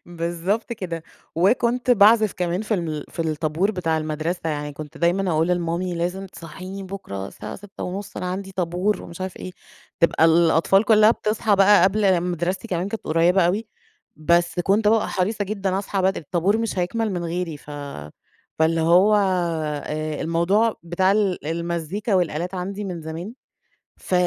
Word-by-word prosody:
بالضبط 175 +7 -2
كده، 170 -7 -5 0.3
وكنت 240 +7 +2
باعزف 215 -1 +6
كمان 180 +2 -2
في 215 0 -1
الم 160 -5 -3
في - - -6
الطابور 160 +4 0
بتاع 165 -5 -1
المدرسة، 155 +3 -3
يعني 150 -1 -4
كنت 150 0 -9
دايمًا 180 +2 +1
أقول 160 +2 +1
لمامي 175 0 -1
لازم 180 +3 -3
تصحيني 185 +3 -9
بُكرة 185 - -6
الساعة - - -8
06:30، 200 0 -7
أنا 180 - -3
عندي 190 +1 -4
طابور 180 +3 -1
ومش 170 +2 -10
عارف 185 -1 -4
إيه، - - -7 0.5
تبقى 170 -1 +4
الأطفال 165 +4 +4
كلّها 215 0 +6
بتصحى 215 -2 +1
بقى 195 -1 +6
قبل 190 -2 +3
مدرستي 180 +4 -2
كمان 180 +2 -1
كانت 225 - -6
قريبة 170 +3 +3
أوي، 210 +5 -1 0.5
بس 170 +3 +2
كنت 205 +3 +2
بابقى 220 0 +3
حريصة 205 +3 -1
جدًا 195 -2 -2
أصحى 195 -1 -2
بدري، 190 0 +1
الطابور 180 +7 +1
مش 225 -4 -2
هيكمل 210 +4 -1
من 175 -1 -3
غيري، 170 -2 -3
ف 145 - -15 0.9
فاللي 160 +1 +2
هو 180 +6 +5
آآ، 155 -5 -1
الموضوع 190 +7 +1
بتاع 185 +3 +1
ال 195 -7 0
المزيكا 170 +5 -2
والآلات 175 0 0
عندي 195 +3 -4
من 180 -3 -5
زمان 165 +8 -6 0.6
ف - - -7
180 Hz, 155 wpm, -23 LUFS, 165-200 Hz, 0.9 s, باعزف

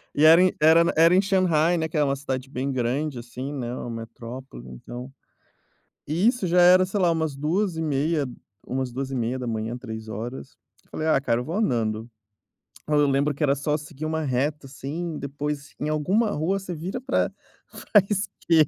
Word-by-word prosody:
e 150 - +4
era 165 +2 +8
em 185 0 +4
era 160 +2 +7
na 170 - +1
era 165 +2 +6
em 190 - +5
Xangai, 175 -4 +2
né, 160 -1 0
que 155 - -4
é 150 - +4
uma 140 -1 +1
cidade 135 -2 -4
bem 135 +1 -2
grande, 130 +3 -1
assim, 125 +3 -6
né, 125 -4 -4
uma 120 - -5
metrópole, 115 - -8
então. 120 - -9 1.0
E 170 +8 +2
isso 240 -4 +1
já 175 +1 +4
era, 180 +1 +7
sei 195 +2 -2
lá, 180 -2 +4
umas 160 -3 -1
2 165 +6 0
e - - -2
meia 150 0 0 0.4
umas 130 -1 -2
2h30, 120 -3 -3
3 110 -3 -7
horas, 120 +6 -7 0.3
eu - - -31
falei: 155 - -3
"Ah, 155 -3 +4
cara 115 -3 +1
eu - - -7
vou 165 - -4
andando". 115 - 0 0.8
Aí 150 - +1
eu 145 0 +5
lembro 140 +2 +2
que 140 - -6
era 140 -2 +4
só 145 +2 0
seguir 150 0 -8
uma 160 0 -1
reta, 140 +2 -1
assim, 150 +5 -5
depois 145 +1 -5
em 150 - -1
alguma 185 +9 +1
rua 180 +4 0
você 185 -2 -6
vira 180 +10 -4
pra 265 +1 0 0.6
pra 210 - +8
esquer 180 -6 +2
150 Hz, 195 wpm, -25 LUFS, 130-165 Hz, 1.0 s, era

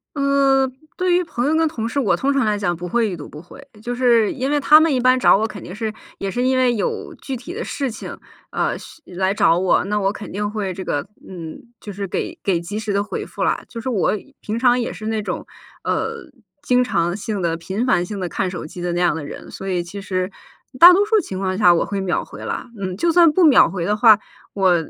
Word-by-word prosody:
呃， 275 -1 +3 0.3
对 365 -1 +1
于 360 +1 +3
朋 250 -7 -3
友 295 - +2
跟 325 0 +3
同 230 -8 -4
事， 280 - -2
我 250 - +2
通 280 +1 0
常 275 -3 +1
来 210 -1 +1
讲 175 -4 -1
不 175 +1 -6
会 230 +3 +1
已 185 - -4
读 145 - -9
不 150 - -10
回。 275 +11 -15 0.2
就 245 +1 -3
是 240 -3 +3
因 265 0 -2
为 295 0 +2
他 300 +2 +7
们 315 -2 +3
一 255 - +1
般 255 +1 +4
找 220 - +6
我 220 - 0
肯 205 -3 -9
定 180 - -8
是 220 -1 -3 0.2
也 195 -1 -3
是 245 - -2
因 260 0 +2
为 255 -1 +3
有 215 - -3
具 270 - -6
体 255 +8 -8
的 460 +4 -4
事 275 -3 -3
情， - - -8 0.3
呃， - - -1
需 330 - -14
来 190 +2 -1
找 170 -4 +3
我， 185 0 +2
那 210 +2 -1
我 195 -1 +1
肯 205 0 -9
定 205 +1 -2
会 205 -3 -3
这 190 - -6
个， 145 -5 -2 0.2
嗯， 165 -4 -8 0.2
就 205 - -8
是 200 +1 -4
给 - - -4
给 185 -4 +1
及 205 +5 -5
时 210 -2 -3
地 200 - +1
回 - - -5
复 - - -5
了。 - - 0
就 235 - -8
是 260 - -3
我 215 -7 +1 0.3
平 215 +1 -3
常 245 +1 +3
也 235 - -2
是 215 - -9
那 220 -1 -1
种， 205 - -4 0.4
呃， 460 - -1 0.5
经 250 -2 +3
常 175 -7 0
性 210 -1 -4
地 170 -2 0
频 190 +8 -3
繁 245 -9 +2
性 205 +2 -6
地 185 - -2
看 185 +2 -2
手 180 -3 -6
机 175 +3 -9
的 175 -1 -2
那 175 - -1
样 175 -3 +2
的 160 - -5
人， - - -9
所 195 - -7
以 180 -2 -1
其 200 +4 -8
实 185 0 -2 0.5
大 355 +1 +11
多 400 +3 +3
数 435 +1 +3
情 195 - -5
况 185 -1 -1
下 180 -4 +6
我 - - +1
会 200 -1 -3
秒 185 -2 -1
回 - - -11
啦。 - - -4
嗯， 185 -2 -4
就 340 +9 +2
算 335 -2 +6
不 365 +3 +3
秒 295 -5 +6
回 180 -3 -3
的 210 - +1
话， 215 -1 +6 0.3
我 190 -3 +3
210 Hz, 275 characters per minute, -20 LUFS, 185-260 Hz, 0.5 s, 大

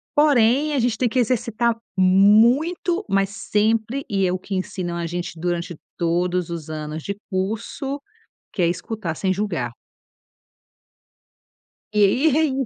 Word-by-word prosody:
Porém, 290 0 +4
a 275 - +1
gente 235 -2 +1
tem 245 -2 +1
que 255 - 0
exercitar 235 -1 +1 0.2
muito, 235 - +4
mas 195 0 +2
sempre 220 +6 0
e 195 -2 +1
é 180 - +1
o 185 - -2
que 195 +1 -5
ensinam 185 -2 -3
a 170 -1 -3
gente 175 0 -5
durante 175 0 -2 0.2
todos 175 +1 0
os 165 -2 -6
anos 155 0 -5
de 200 0 -4
curso, 225 +9 -3 0.5
que 185 - -3
é 170 - +4
escutar 180 -1 -3
sem 190 +2 0
julgar. 175 - -2 2.2
E 210 -1 +4
aí 275 +8 +3
é 320 - +4
i 270 -2 -1
205 Hz, 145 wpm, -22 LUFS, 180-245 Hz, 2.2 s, Porém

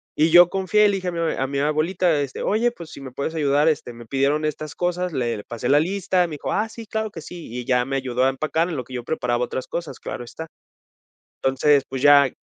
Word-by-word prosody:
Y 155 +2 +3
yo 175 0 +8
confié 195 +2 +2
y - - +7
le 200 - +1
dije 185 -1 -5
a - - 0
mi 170 - -4
abue 165 - 0
a 135 - 0
mi 140 0 -2
abuelita, 155 +2 +1
este: 140 -2 -4
"Oye, 235 +3 +1
pues, 170 -8 -11
si - - -10
me 130 -2 -8
puedes 140 +5 -4
ayudar, 145 0 +2
este, 135 -5 -2
me 120 0 -11
pidieron 140 +4 +1
estas 155 0 -4
cosas" 180 -1 -1
Le 120 -4 -1
le 105 - -8
pasé 120 +3 -4
la 145 +1 +6
lista, 185 +1 +1
me 155 - -6
dijo: - - -4
"Ah 215 +2 0
sí, 225 0 -10
claro 220 0 -3
que 165 - -8
sí". 175 0 -9
Y 125 0 -5
ya 125 -1 +2
me 135 - -3
ayudó 130 -2 -1
a 135 - +4
empacar 155 +5 0
en 165 - -3
lo 130 - -3
que 130 - -13
yo 120 - -4
preparaba 125 -4 -1
otras 130 - -5
cosas, 165 -6 -5
claro - - -6
está. 160 +7 -8 1.0
Entonces, 135 +2 +3
pues 135 -1 -4
ya 140 -1 +6
150 Hz, 260 wpm, -23 LUFS, 135-175 Hz, 1.0 s, yo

